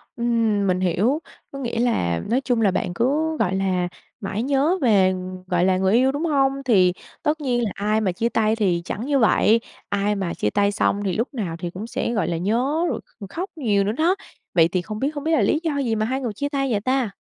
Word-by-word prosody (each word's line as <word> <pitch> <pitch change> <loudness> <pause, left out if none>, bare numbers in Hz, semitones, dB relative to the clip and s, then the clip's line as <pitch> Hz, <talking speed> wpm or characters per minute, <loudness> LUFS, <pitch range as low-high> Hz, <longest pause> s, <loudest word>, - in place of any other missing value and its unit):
Ừm, 230 -4 +1
mình 185 0 +1
hiểu, 195 - +1 0.3
có 275 - -7
nghĩa 235 -3 -3
là 90 - +1
nói 250 +4 +2
chung 245 -4 0
là 205 -3 +4
bạn 180 - -2
cứ, 305 - +1
gọi 190 -4 +1
là, 185 -2 0 0.3
mãi 205 +1 -3
nhớ 285 +7 +2
về, 195 -6 +4 0.3
gọi 180 0 +2
là, 185 -1 +3
người 190 +1 +2
yêu, 255 +3 +4
đúng 290 +4 -2
hông? 275 -3 +1
Thì 185 -7 +4 0.3
tất 305 +1 0
nhiên 245 -4 0
là 215 - -1
ai 210 +2 0
mà 195 - +1
chia 225 +7 -1
tay 220 -1 +1
thì 185 -6 +1
chẳng 210 +5 -4
như 280 -1 +2
vậy, 225 0 +4 0.3
ai 205 +1 0
mà 190 -4 -2
chia 105 - -1
tay 200 - +2
xong 200 0 0
thì 190 - 0
lúc 235 +6 -2
nào 195 -10 -3
thì 175 - -3
cũng 195 +6 -7
sẽ, 235 - -2
gọi 210 -7 0
là, 170 -1 -1
nhớ 250 - 0
rồi - - -2 0.2
kh 200 -3 -8
khóc 360 - -4
nhiều 215 -10 +1
nữa 200 - 0
đó. 325 - +2 0.4
Vậy 165 -2 +5
thì 180 +1 -1
không 215 +3 -6
biết 275 +4 +1
không 290 -1 -5
biết 325 - 0
là 320 - +3
lý 310 - +2
do 310 -4 -1
gì 240 -5 0
mà 215 - 0
hai 260 +4 -2
người 235 -5 -3
chia 285 +7 -3
tay 275 -2 -1
vậy 205 -3 0
ta? 255 -2 0
225 Hz, 245 wpm, -22 LUFS, 195-270 Hz, 0.4 s, Vậy